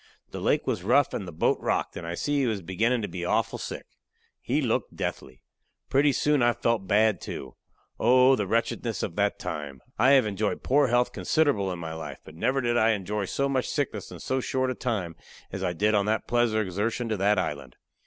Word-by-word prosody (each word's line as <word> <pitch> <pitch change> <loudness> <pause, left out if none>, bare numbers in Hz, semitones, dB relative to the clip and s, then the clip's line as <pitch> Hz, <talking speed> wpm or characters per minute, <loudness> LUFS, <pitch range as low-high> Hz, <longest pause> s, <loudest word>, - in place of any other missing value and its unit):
The - - -6
lake - - +1
was - - -1
rough 130 +8 +3
and 95 - -4
the - - -6
boat 80 - +1
rocked, - - -1
and 85 - -6
I 85 - -3
see 145 +9 0
he 135 - +2
was 105 -5 -2
beginning 110 +7 0
to - - -1
be 90 - -6
awful 90 - 0
sick. - - -6 0.6
He - - 0
looked - - -1
deathly. 65 -1 -5 0.5
Pretty 140 +2 +4
soon 145 +1 +2
I 120 0 +4
felt 115 -4 -1
bad, 110 +2 +3
too. 65 -2 -7 0.5
Oh! 130 +3 +5
the 105 -5 -2
wretchedness 115 +1 -1
of 85 - -4
that 100 0 +1
time. 70 -3 -5 0.2
I 130 +4 +6
have 135 -4 +5
enjoyed 105 0 -2
poor 140 +1 +3
health 120 0 +2
considerable 140 -12 +1
in 90 - -4
my 80 -1 -6
life, 80 0 -7
but - - -12
never 130 - 0
did 120 -1 +1
I 110 0 +4
enjoy 105 0 -2
so 140 +8 -1
much 135 -2 -1
sickness 130 -9 -2
in 90 - -10
so 130 +8 -1
short 130 0 -1
a - - -1
time 105 -10 -3 0.4
as - - -4
I - - 0
did 105 +5 +1
on 100 -1 +2
that 110 +1 0
pleasure 120 -2 +2
exertion 105 +5 -2
to 110 - -1
that 100 +2 +2
island. 70 -8 -3
110 Hz, 215 wpm, -27 LUFS, 95-125 Hz, 0.6 s, I